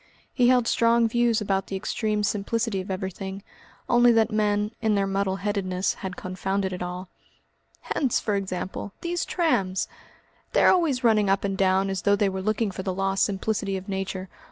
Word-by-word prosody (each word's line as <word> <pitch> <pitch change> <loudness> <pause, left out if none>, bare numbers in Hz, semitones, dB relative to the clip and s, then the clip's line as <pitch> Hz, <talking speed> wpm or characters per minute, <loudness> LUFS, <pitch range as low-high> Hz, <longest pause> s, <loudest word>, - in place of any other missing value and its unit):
He 245 -3 +3
held 250 -2 +4
strong 230 0 +3
views 235 -1 +2
about 195 -2 -1
the 195 - -4
extreme 210 +2 -1
simplicity 210 0 -1
of 185 - -10
everything, 190 +1 -5 0.4
only 240 0 +5
that 225 0 +3
men, 210 0 +1
in 220 -2 +2
their 200 -1 +2
muddle 195 0 0
headedness, 195 -2 -1
had 190 -1 -6
confounded 190 +1 -2
it 180 - -6
all. 180 +1 -5 0.7
"Hence, 265 -5 0
for 210 - -2
example, 190 +1 -4
these 345 0 -2
trams! 195 - 0 0.7
They - - +4
are - - +7
always 310 -8 +1
running 215 -4 +4
up 195 0 +2
and 195 -1 -1
down 190 0 +2
as 190 -2 -2
though 200 0 +3
they 205 -1 +2
were 190 0 -4
looking 215 +1 0
for 190 - -5
the 190 - -2
lost 195 0 +1
simplicity 200 0 -2
of 190 - -9
nature. 190 -1 -3
200 Hz, 180 wpm, -25 LUFS, 190-220 Hz, 0.7 s, are